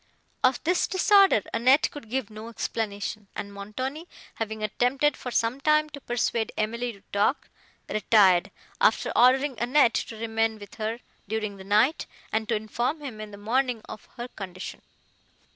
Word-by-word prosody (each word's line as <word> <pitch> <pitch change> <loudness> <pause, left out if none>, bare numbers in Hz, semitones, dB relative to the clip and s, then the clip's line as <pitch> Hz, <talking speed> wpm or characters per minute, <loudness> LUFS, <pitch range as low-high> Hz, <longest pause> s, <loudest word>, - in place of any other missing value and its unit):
Of 255 0 +3
this 355 +2 +2
disorder 385 - +5
Annette 255 +5 +4
could 285 -7 -10
give 255 -3 -2
no 215 +2 -8
explanation, 210 -2 -4
and 200 0 -6
Montoni, 255 - -5 0.3
having 220 -1 -4
attempted, 250 +7 +1
for 250 - -6
some 240 +2 0
time, 305 +1 +3
to 285 - -9
persuade 235 -2 -1
Emily 235 +3 -1
to 200 -3 -16
talk, 205 +7 +1 0.4
retired, 200 -4 +4 0.3
after - - +3
ordering 260 +1 +4
Annette 245 0 +4
to 225 - -3
remain 225 0 0
with 205 -1 -12
her, 225 +3 -2 0.3
during 215 -1 -3
the 190 - -10
night, 215 +10 +2 0.3
and 220 +1 -1
to 230 - +2
inform 240 +8 -2
him, 245 -7 -7
in 215 - -7
the 200 - -11
morning, 235 +2 0
of 215 - -9
her 240 +1 -5
condition. 185 -4 -8
230 Hz, 160 wpm, -26 LUFS, 215-260 Hz, 0.4 s, disorder